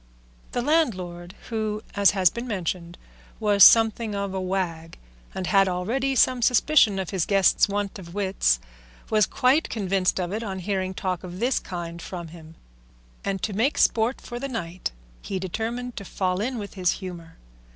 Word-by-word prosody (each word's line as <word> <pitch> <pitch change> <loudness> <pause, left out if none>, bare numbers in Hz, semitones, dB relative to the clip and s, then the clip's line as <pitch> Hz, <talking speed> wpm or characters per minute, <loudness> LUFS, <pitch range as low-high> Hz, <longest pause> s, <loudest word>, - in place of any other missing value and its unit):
The 245 - -1
landlord, 185 - 0
who, 215 -2 -2
as 200 -1 +5
has 185 -3 +5
been 235 +1 -6
mentioned, 175 -4 -4 0.4
was 205 -3 +5
something 225 -1 +6
of 200 -1 -3
a 190 - -2
wag, 175 -3 -3 0.4
and 190 - -3
had 195 +1 +4
already 240 +10 -1
some 255 0 +3
suspicion 240 -3 +4
of 190 -3 -3
his 190 -4 0
guest's 195 +2 +3
want 200 0 -3
of 170 -1 -11
wits, 190 - +1 0.5
was 215 -2 +4
quite 275 +4 +2
convinced 190 -3 0
of 180 +1 -2
it 220 - -2
on 195 -4 -4
hearing 190 0 -2
talk 185 -2 -3
of 180 0 -8
this 245 +3 +1
kind 170 -1 -6
from 170 -1 -7
him, 160 -1 -13 0.7
and 195 -2 -3
to 215 - -1
make 235 +9 +1
sport 230 +3 +2
for 240 -1 -7
the 275 +2 -4
night 185 -7 -4 0.3
he 195 - -4
determined 230 +6 -4
to 200 - -5
fall 185 0 -1
in 250 +3 -2
with 205 -2 -6
his 180 -2 +1
humour. 175 -4 -9
195 Hz, 170 wpm, -25 LUFS, 180-225 Hz, 0.7 s, something